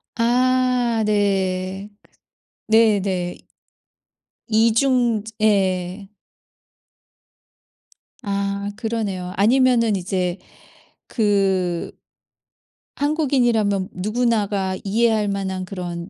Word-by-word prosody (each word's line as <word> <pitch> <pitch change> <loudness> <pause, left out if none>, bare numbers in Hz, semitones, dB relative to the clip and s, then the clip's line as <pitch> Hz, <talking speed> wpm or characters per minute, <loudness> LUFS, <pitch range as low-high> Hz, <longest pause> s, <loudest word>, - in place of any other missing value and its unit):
아 250 -1 +1
네. 195 -1 -1
그 - - -27 0.6
네네. 200 -5 +2 1.1
이중저 230 0 +2 0.2
예. 190 -2 0 2.2
아 200 0 -2
그러네요. 200 -6 -3
아니면은 230 0 +3
이제 185 -1 -2 0.7
그 195 -5 0 1.0
한국인이라면 240 - +1
누구나가 205 -2 -1
이해할 215 +1 +1
만한 190 -2 -3
그런 180 -1 -6
205 Hz, 140 characters per minute, -21 LUFS, 190-230 Hz, 2.2 s, 아니면은